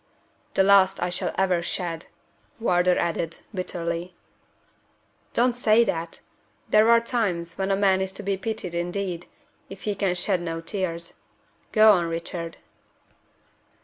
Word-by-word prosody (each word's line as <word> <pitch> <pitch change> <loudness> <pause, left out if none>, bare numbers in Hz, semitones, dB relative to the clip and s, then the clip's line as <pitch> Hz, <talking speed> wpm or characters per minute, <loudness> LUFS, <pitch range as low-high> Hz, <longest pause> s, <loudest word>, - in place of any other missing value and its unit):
"The 190 - +5
last 195 -1 +5
I 175 0 -1
shall 175 - -2
ever 185 -2 +2
shed," 170 -1 -3 0.5
Wardour 180 -4 +3
added, 170 -1 -1 0.2
bitterly. 175 -1 -4 1.2
"Don't 245 +1 +3
say 235 -1 +4
that! 165 -6 -3 0.5
There 215 +2 +5
are 235 0 +7
times 205 -8 -2
when 190 0 0
a 195 - +3
man 195 -1 +3
is 190 0 -2
to - - -8
be 200 0 0
pitied 195 -2 -4
indeed, 175 0 -3 0.4
if 195 0 -10
he 210 - -1
can 195 -2 0
shed 180 0 0
no 165 -1 -3
tears. 170 -1 -4 0.5
Go 215 -1 +7
on, 180 -4 +3
Richard." 165 0 -5
185 Hz, 140 wpm, -25 LUFS, 170-200 Hz, 1.2 s, are